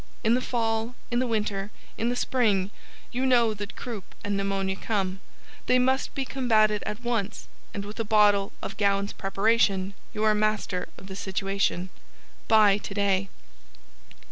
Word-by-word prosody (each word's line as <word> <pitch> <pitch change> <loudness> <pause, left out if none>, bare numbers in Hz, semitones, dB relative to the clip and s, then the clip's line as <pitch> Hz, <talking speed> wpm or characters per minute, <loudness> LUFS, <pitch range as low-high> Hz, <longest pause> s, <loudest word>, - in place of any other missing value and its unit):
In 225 0 +4
the 250 - +2
Fall, 225 -1 -1 0.2
in 240 - +2
the 255 - +1
Winter, 210 -3 -1 0.3
in 230 - 0
the 245 - 0
Spring, 210 -7 +1 0.4
you 255 +1 -1
know 240 -4 +4
that 205 +1 -7
Croup 225 -6 -7
and 205 0 -1
Pneumonia 195 -1 -1
come, 195 -2 -2 0.5
they 250 - +5
must 260 +2 +1
be 275 - -1
combated 220 -5 +2
at 210 +3 -5
once 225 -4 -2 0.2
and 200 0 -5
with 210 +3 -8
a - - +1
bottle 205 -2 +4
of - - -5
Gowans 200 0 +1
Preparation 195 -1 +1 0.2
you 215 - -3
are 215 0 +5
master 210 -3 0
of - - -11
the 190 0 -8
situation. 195 -1 -1 0.6
Buy 210 -2 +6
today! 195 -1 0
210 Hz, 155 wpm, -27 LUFS, 195-230 Hz, 0.6 s, Buy